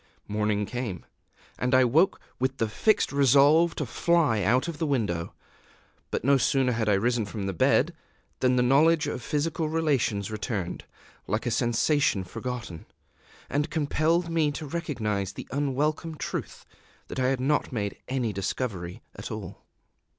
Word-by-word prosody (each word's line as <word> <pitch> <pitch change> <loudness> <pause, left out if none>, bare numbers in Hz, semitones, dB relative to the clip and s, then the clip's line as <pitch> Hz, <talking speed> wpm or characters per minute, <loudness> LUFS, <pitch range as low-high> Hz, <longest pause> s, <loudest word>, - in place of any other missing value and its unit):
Morning 105 0 0
came; 120 -6 -5 0.5
and 125 +1 +2
I 130 - +6
woke 160 +10 +3 0.2
with 130 +1 -1
the 115 - +1
fixed 215 - +2
resolve 140 +5 +5
to - - -2
fly 165 -11 +2
out 125 - +2
of 165 -3 -5
the 160 - 0
window. 105 -12 -1 0.7
But - - -2
no 140 +2 +5
sooner 130 0 +2
had 115 -2 0
I - - +4
risen 120 +3 +1
from 105 -2 -5
bed 95 -4 +2 0.5
than 130 0 +3
the 125 - +3
knowledge 150 +5 +4
of - - -3
physical 155 +4 -1
relations 135 -11 0
returned, 105 -5 -4 0.4
like 105 +5 -1
a 120 - 0
sensation 120 -1 +2
forgotten, 115 -2 -6 0.6
and 145 +3 -1
compelled 160 +3 +1
me 165 -3 +1
to 155 - -5
recognize 110 - -2
the - - -8
unwelcome 145 +4 -1
truth - - -5 0.4
that - - -5
I 130 - +2
had 135 0 +1
not 145 +4 +1
made 100 -5 -3
any 125 -4 -1
discovery 95 -2 -4
at - - -7
all. - - -8
130 Hz, 150 wpm, -27 LUFS, 110-150 Hz, 0.7 s, I